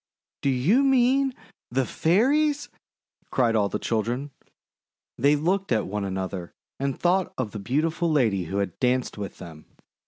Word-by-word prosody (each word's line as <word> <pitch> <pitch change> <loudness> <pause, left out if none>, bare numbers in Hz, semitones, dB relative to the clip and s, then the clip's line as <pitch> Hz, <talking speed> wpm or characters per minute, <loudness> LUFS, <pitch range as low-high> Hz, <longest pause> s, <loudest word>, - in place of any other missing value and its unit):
:<Do 140 - +1
you 145 - +3
mean 265 0 +3 0.3
the 130 +1 0
Fairies?' 280 - +2 0.6
cried 120 -3 +2
all 100 -2 +2
the - - -2
children. 120 +5 -2 0.8
They 140 +4 +3
looked 185 +5 0
at 110 - +2
one 105 +1 -3
another 95 -2 -4 0.2
and 135 -1 -1
thought 180 +1 +2
of 120 -5 -2
the 105 - -6
beautiful 160 - 0
lady 110 - +2
who 95 +5 -4
had 100 -3 -2
danced 125 -3 0
with 100 - -6
them. 80 -4 -11
130 Hz, 150 wpm, -25 LUFS, -, 0.8 s, you